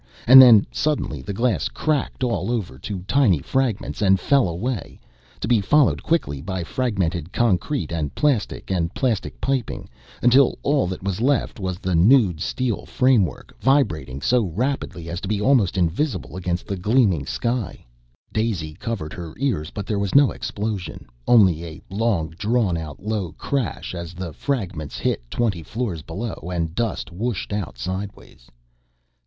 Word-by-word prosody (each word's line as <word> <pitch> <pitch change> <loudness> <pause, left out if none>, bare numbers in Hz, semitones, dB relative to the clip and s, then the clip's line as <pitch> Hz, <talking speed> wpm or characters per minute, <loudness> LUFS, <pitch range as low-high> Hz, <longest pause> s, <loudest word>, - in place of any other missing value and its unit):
and 130 +3 +11
then 115 -5 +8
suddenly 145 - -1
the 65 - -5
glass 115 +3 0
cracked 150 -3 -1
all 105 -5 -1
over 100 - -3
to 95 +1 -5
tiny 105 - +3
fragments 120 - -2
and 95 -2 +4
fell 135 -2 +3
away, 100 +4 -4 0.4
to - - -3
be 115 -3 +3
followed 145 +8 +3
quickly 70 - -1
by 95 +2 -3
fragmented 90 - -2
concrete 120 +5 0
and 80 -4 -3
plastic 135 -9 0
and 85 -3 0
plastic 120 -6 -1
piping, 135 -3 -2 0.4
until 125 +2 +5
all 140 -7 +2
that 95 0 -5
was 100 +1 -2
left 135 -3 +1
was 95 -2 -3
the 95 -1 -2
nude 90 - +4
steel 125 +1 -2
framework, 125 - +1
vibrating 75 - +1
so 125 0 +3
rapidly 100 - -3
as 85 +2 -4
to - - -5
be 105 0 0
almost 105 -5 +3
invisible 95 - -1
against 90 -1 -2
the 100 - -3
gleaming 95 - +2 0.2
lake. 120 -2 -2 0.5
Daisy 100 -9 -1
covered 95 -4 -5
her 85 -3 -8
ears, 115 - -1
but 100 - -6
there 105 -1 -1
was 100 +3 -2
no 140 -1 +6
explosion, 105 -3 -4 0.2
only 95 -9 +5
a 80 -2 -8
long 100 -6 0
drawn 105 -4 +1
out 80 -3 -6
low 105 -5 -2
crash 130 - -3
as 85 -1 -6
the 85 -2 -6
fragments 90 - -3
hit - - -1
twenty 105 - -1
floors 100 -1 -4
below 95 +3 -6
and 85 -2 -2
dust 110 -2 -2
whooshed 105 +2 -3
out 100 -11 -4
sideways. 95 -3 -6
100 Hz, 155 wpm, -22 LUFS, 85-120 Hz, 0.5 s, and